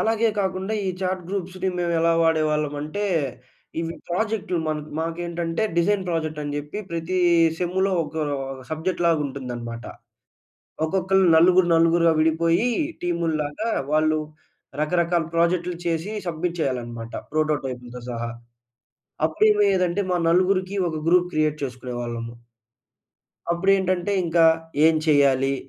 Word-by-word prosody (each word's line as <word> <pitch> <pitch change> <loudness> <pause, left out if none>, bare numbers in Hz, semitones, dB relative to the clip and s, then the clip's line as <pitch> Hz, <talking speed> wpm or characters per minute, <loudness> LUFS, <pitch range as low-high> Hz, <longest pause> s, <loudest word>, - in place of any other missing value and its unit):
అలాగే 225 +1 +2
కాకుండా 190 +2 -2
ఈ - - 0
చాట్ 185 -1 -1
గ్రూప్స్‌ని 190 -1 -3
మేము 175 -1 0
ఎలా 165 0 +3
వాడేవాళ్ళం 155 -2 +1
అంటే, 155 +8 -3 0.8
ఇవి 165 0 -3
ప్రాజెక్ట్‌లు 190 -1 -1
మన్ 155 -1 -1 0.2
మాకేంటంటే 170 +2 -2
డిజైన్ 190 +3 +2
ప్రాజెక్ట్ 160 -2 -2
అని 145 0 -4
జెప్పి 150 +7 -5
ప్రతి 170 +2 -2 0.4
సెమ్‌లో 190 +2 0
ఒకా 155 +1 -5 0.5
సబ్జెక్ట్‌లాగా 165 0 0
ఉంటుందన్నమాట. 120 -4 -6 1.0
ఒక్కొక్కళ్ళు 190 +2 +2
నలుగురు 180 +2 +5
నలుగురుగా 165 0 +4
విడిపోయి 165 +7 +2 0.3
టీముల్లాగా, 170 +3 -1 0.2
వాళ్ళు 155 0 +3 0.6
రకరకాల 170 +1 +1
ప్రాజెక్ట్‌లు 170 +1 +1
చేసి 170 +5 -1
సబ్‌మిట్ 170 +1 -2
చేయాలన్నమాట 120 -4 -3 0.2
ప్రోటోటైప్‌లతో 135 -6 -2
సహా. 115 0 -4 0.9
అప్పుడు 160 +6 +2
ఏమయ్యేదంటే 195 -3 +2
మా 180 - +2
నలుగురికి 185 +2 +2
ఒక 160 - -4
గ్రూప్ 175 +1 +4
క్రియేట్ 155 -1 +1
చేసుకునేవాళ్ళము. 120 -2 -5 1.2
అప్పుడేంటంటే 185 +1 +1
ఇంకా 165 0 +3 0.4
ఏం 160 - +4
చెయ్యాలి? 140 -2 +3
165 Hz, 110 wpm, -23 LUFS, 150-185 Hz, 1.2 s, నలుగురు